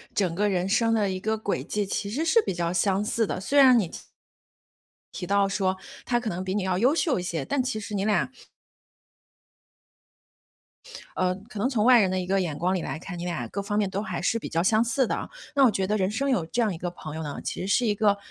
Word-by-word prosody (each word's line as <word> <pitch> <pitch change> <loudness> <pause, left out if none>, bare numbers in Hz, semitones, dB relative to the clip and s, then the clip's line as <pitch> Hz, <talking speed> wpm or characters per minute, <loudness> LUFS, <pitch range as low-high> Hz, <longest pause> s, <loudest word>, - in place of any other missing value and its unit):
整 185 -5 +1
个 205 +3 +1
人 185 -1 0
生 225 +3 +2
的 210 -3 +2
一 185 - -3
个 220 +3 -1
轨 210 -2 -2
迹， 210 -1 -2
其 200 +1 -3
实 275 +9 -1
是 455 +8 +4
比 - - -1
较 170 -1 -1
相 195 +2 +1
似 225 0 0
的， - - -3
虽 275 +10 +2
然 255 -3 +8
你 195 -7 +1
提 - - -9 1.1
提 180 - -5
到 200 0 +3
说 190 -1 0 0.3
他 240 -1 +1
可 240 -2 -3
能 180 0 -4
比 190 +1 -3
你 205 - 0
要 185 -1 0
优 255 +9 +3
秀 305 - +1
一 - - -4
些， 165 -5 -3
但 280 -2 0
其 250 -3 -2
实 210 0 -7
你 200 0 -1
俩 210 +2 +1 2.9
呃， 185 0 +1
可 210 - -7
能 250 - +1
从 225 -6 +1
外 245 -1 +7
人 190 - +2
的 185 - -1
一 180 - -3
个 195 +1 +2
眼 160 -5 -3
光 180 +4 0
里 185 - -1
来 - - -4
看， 180 0 -7
你 175 - -5
们 175 - -2
俩 120 -7 -4
各 200 - -4
方 205 +1 -2
面 205 -2 +1
都 195 +1 -2
还 220 - -4
是 230 - +1
比 - - -6
较 165 +1 0
相 220 +4 +3
似 250 +2 +1
的 - - -1
啊。 - - -5 0.3
那 275 - +5
我 230 - +5
觉 190 -1 -1
得 210 - +1
人 190 -1 +1
生 275 +6 -1
有 190 -11 +1
这 240 +9 -1
样 215 -4 +1
一 165 - -6
个 175 - -3
朋 155 -3 -8
友 160 - -4
呢， 145 -2 -5
其 - - -4
实 185 - -3
是 220 +5 +2
一 210 - +2
个， 205 -1 +3
200 Hz, 285 characters per minute, -26 LUFS, 185-225 Hz, 2.9 s, 然